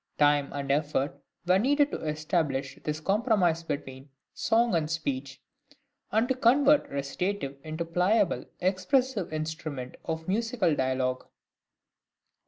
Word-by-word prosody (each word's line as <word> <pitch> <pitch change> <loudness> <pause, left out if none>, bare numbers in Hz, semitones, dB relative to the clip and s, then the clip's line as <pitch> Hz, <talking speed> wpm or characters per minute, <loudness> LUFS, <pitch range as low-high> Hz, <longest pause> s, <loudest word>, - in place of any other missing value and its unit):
Time 145 -1 +3
and 140 -1 -3
effort 145 0 0 0.2
were 180 +2 +4
needed 290 +5 +3
to - - -4
establish 150 -2 -1
this 150 0 -2
compromise 195 -3 +2
between 135 -3 -6 0.2
song 230 0 +2
and 160 -3 +1
speech, 140 -4 -3 0.7
and 220 +3 +2
to 260 - +2
convert 275 +4 +4
recitative 140 +2 -3
into 155 +1 -4
the 165 - -14
pliable, 185 +2 +2 0.2
expressive 200 - +1
instrument 155 -4 -5
of 160 0 -4
musical 225 -4 +1
dialogue. 130 -1 -1
160 Hz, 120 wpm, -28 LUFS, 145-210 Hz, 0.7 s, were